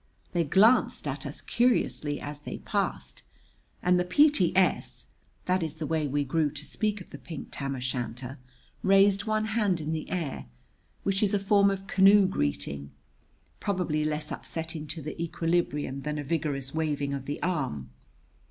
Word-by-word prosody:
They 175 -1 +1
glanced 210 - +4
at - - -4
us - - -6
curiously 230 -11 +1
as 145 0 -6
they - - -6
passed, - - -3 0.6
and 180 0 +4
the - - +2
P.T.S. 190 - +3 0.4
that 185 0 +2
is 160 -2 -3
the 160 -1 -4
way 155 0 0
we 145 +1 0
grew 150 +2 +1
to 150 +1 -7
speak 210 +1 -1
of - - -13
the - - -9
pink 160 -5 -8
tam 140 -1 -3
o' - - -5
shanter 125 0 -4 0.4
raised 195 +1 +4
one 215 0 +1
hand 205 -6 +2
in 155 +1 -3
the 155 - -4
air, 165 - -3 0.6
which 195 0 +1
is 205 -1 +2
a - - +2
form 200 0 +4
of 195 0 -3
canoe 195 +1 +6
greeting, 70 - -2 0.7
probably 180 -6 0
less 150 0 -1
upsetting 160 -1 -5
to 160 0 -6
the 155 +3 -5
equilibrium 165 -5 -1
than 150 +1 -3
a 145 - -3
vigorous 140 -3 -2
waving 145 -3 -1
of 135 -1 -4
the 145 - -4
arm. 130 - -2
160 Hz, 165 wpm, -28 LUFS, 145-190 Hz, 0.7 s, canoe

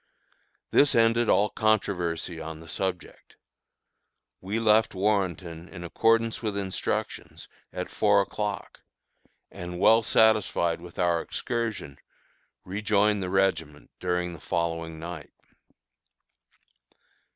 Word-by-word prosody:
This 145 - +4
ended 115 0 +3
all 105 +1 +3
controversy 90 -6 0
on 80 0 -7
the 85 - -13
subject. 95 0 -5 1.1
We 100 +4 -3
left 110 -1 +3
Warrenton 95 -4 -1
in 85 -3 -9
accordance 115 +6 +1
with 105 -3 -2
instructions, 95 -2 -4 0.2
at 90 - -5
four 105 -1 +3
o'clock, 105 +1 -4 0.7
and, 90 0 -7
well 110 +4 +6
satisfied 105 -7 +2
with 85 -1 -12
our 85 -2 +2
excursion, 115 - -4 0.7
rejoined 105 +1 +1
the 90 - -3
regiment 80 -6 -1
during 90 -1 -1
the 85 - -10
following 85 -1 -2
night. 85 0 -8
95 Hz, 105 wpm, -27 LUFS, 85-105 Hz, 1.1 s, well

